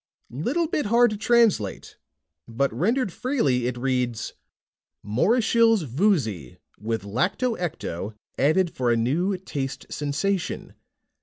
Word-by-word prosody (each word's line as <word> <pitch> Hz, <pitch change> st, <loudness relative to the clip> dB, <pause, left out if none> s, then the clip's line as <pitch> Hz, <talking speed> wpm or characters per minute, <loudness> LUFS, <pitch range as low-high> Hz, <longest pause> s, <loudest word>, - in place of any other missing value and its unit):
"Little 265 Hz, -, 0 dB
bit 305 Hz, -6 st, -1 dB
hard 235 Hz, +1 st, +4 dB
to -, -, -2 dB
translate. 215 Hz, -, +2 dB, 0.5 s
But 130 Hz, +2 st, -1 dB
rendered 210 Hz, -, 0 dB
freely, 145 Hz, -, 0 dB
it 125 Hz, -1 st, -3 dB
reads: 125 Hz, -3 st, -1 dB, 0.7 s
MORISHILLE'S 225 Hz, -, +3 dB
VOOZY, 130 Hz, -, 0 dB, 0.2 s
WITH 110 Hz, +1 st, -3 dB
LACTO 180 Hz, -, 0 dB
ECTO 110 Hz, -, -4 dB, 0.2 s
ADDED 165 Hz, +6 st, +3 dB
FOR 125 Hz, -2 st, -1 dB
A 115 Hz, -, +3 dB
NEW 170 Hz, -, 0 dB
TASTE 140 Hz, -7 st, -5 dB
SENSATION. 150 Hz, +6 st, -2 dB
150 Hz, 110 wpm, -25 LUFS, -, 0.7 s, hard